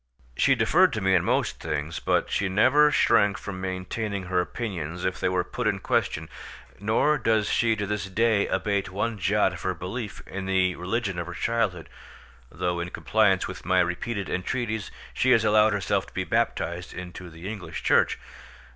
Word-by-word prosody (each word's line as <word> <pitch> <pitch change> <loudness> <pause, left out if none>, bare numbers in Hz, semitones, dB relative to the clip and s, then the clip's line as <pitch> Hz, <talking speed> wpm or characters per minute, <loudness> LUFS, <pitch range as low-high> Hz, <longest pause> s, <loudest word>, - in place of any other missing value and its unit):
She - - +4
deferred - - +4
to - - -2
me 95 0 +2
in 90 -2 +4
most - - 0
things, 75 +3 -3
but - - 0
she 100 - 0
never 130 +10 +5
shrank 105 -8 +3
from 95 -2 -7
maintaining 95 +2 -3
her 90 0 +1
opinions 90 -5 -4
if 95 0 -1
they - - +1
were 90 0 +1
put 125 -3 -3
in 105 -2 +1
question; 80 -4 -1 0.5
nor 110 +9 +2
does 110 -2 +2
she 115 -2 +2
to 105 -1 -3
this 105 0 -2
day 105 +2 +2
abate 100 -3 -1
one 105 +3 -2
jot 90 - +2
of - - -8
her - - -1
belief 105 +3 -6
in 95 0 -6
the 95 -1 +2
religion 100 0 -2
of 85 - -4
her 85 - -7
childhood, 105 -6 -1 0.6
though 90 -1 -2
in 85 +1 -3
compliance - - +2
with - - -8
my 95 0 +2
repeated 95 +4 -1
entreaties 110 +2 -2 0.2
she 130 - +1
has 115 -2 +3
allowed 110 0 +5
herself 100 -1 0
to - - -17
be - - -1
baptized 85 +1 -1
into 90 0 -8
the 85 +3 -9
English 105 -3 -6
Church. - - +3
95 Hz, 180 wpm, -26 LUFS, 90-110 Hz, 0.6 s, never